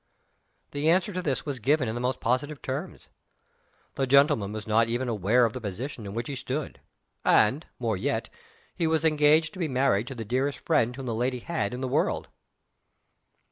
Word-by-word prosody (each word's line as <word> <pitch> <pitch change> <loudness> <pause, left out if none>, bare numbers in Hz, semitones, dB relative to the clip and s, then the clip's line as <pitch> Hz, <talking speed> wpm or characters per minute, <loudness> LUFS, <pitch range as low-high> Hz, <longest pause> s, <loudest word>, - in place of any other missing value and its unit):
_" - - -44
The 145 +2 0
answer 185 +4 +2
to 185 - -2
this 140 -7 -2
was 140 -4 -3
given 135 +2 +2
in 110 - -2
the 120 - -4
most 125 0 -1
positive 135 +5 0
terms. 130 +1 -5 0.8
The 135 - -1
gentleman 140 -6 +4
was 105 -1 -6
not 110 +1 +3
even 120 +2 -1
aware 115 +2 +3
of 115 - -1
the 130 - -6
position 110 +2 -5
in 100 - -7
which 115 +1 -3
he 140 - -4
stood. 135 +3 -4 0.4
And, 130 +10 +3
more 115 -5 -1
yet, - - -1 0.5
he 165 - 0
was 160 0 +1
engaged 155 +1 +4
to 190 - -10
be 170 - 0
married 130 -5 +1
to 135 - -6
the 115 -2 -6
dearest 130 +6 0
friend 125 -7 +1
whom 135 0 -7
the 120 - -2
lady 125 +3 -1
had 170 -1 -2
in 125 +1 -5
the 130 - -1
world. 125 - 0
130 Hz, 200 wpm, -27 LUFS, 115-145 Hz, 0.8 s, gentleman